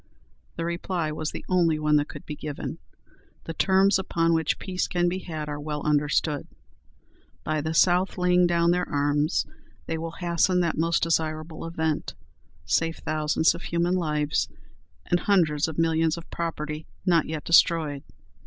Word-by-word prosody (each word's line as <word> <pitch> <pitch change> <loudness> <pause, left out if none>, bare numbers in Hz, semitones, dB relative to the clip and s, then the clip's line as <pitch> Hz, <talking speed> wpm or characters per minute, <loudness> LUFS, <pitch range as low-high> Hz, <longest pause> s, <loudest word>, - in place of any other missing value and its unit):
The 165 - -3
reply 170 -1 -2
was 155 +1 -3
the - - -8
only 170 -4 +2
one 150 0 +3
that 145 0 0
could 145 - -10
be 150 - -5
given. 150 -1 -6 0.6
"The 165 - -6
terms 190 +3 +3
upon 165 -3 +1
which 160 -2 +1
peace 185 -1 -2
can 175 0 +1
be 180 +2 -1
had 155 -5 -6
are 145 0 -4
well 150 0 -4
understood. 150 0 +1 1.0
By 155 -1 -1
the 160 +2 -3
South 180 +3 +3
laying 180 0 +4
down 170 0 +3
their 180 0 0
arms 145 +2 +1 0.4
they 160 0 -3
will 165 0 -5
hasten 175 +1 +2
that 170 -2 0
most 165 +1 +1
desirable 160 0 -1
event, 160 -2 -2 0.5
save 165 0 +1
thousands 155 +1 +1
of 170 - -8
human 170 +1 0
lives, 150 -4 0 0.6
and 175 - +1
hundreds 160 -8 +2
of 160 - -6
millions 165 0 +2
of 165 - -9
property 155 -2 -4 0.2
not 170 -4 +3
yet 155 -1 -4
destroyed." 160 -4 +4
165 Hz, 160 wpm, -26 LUFS, 150-175 Hz, 1.0 s, laying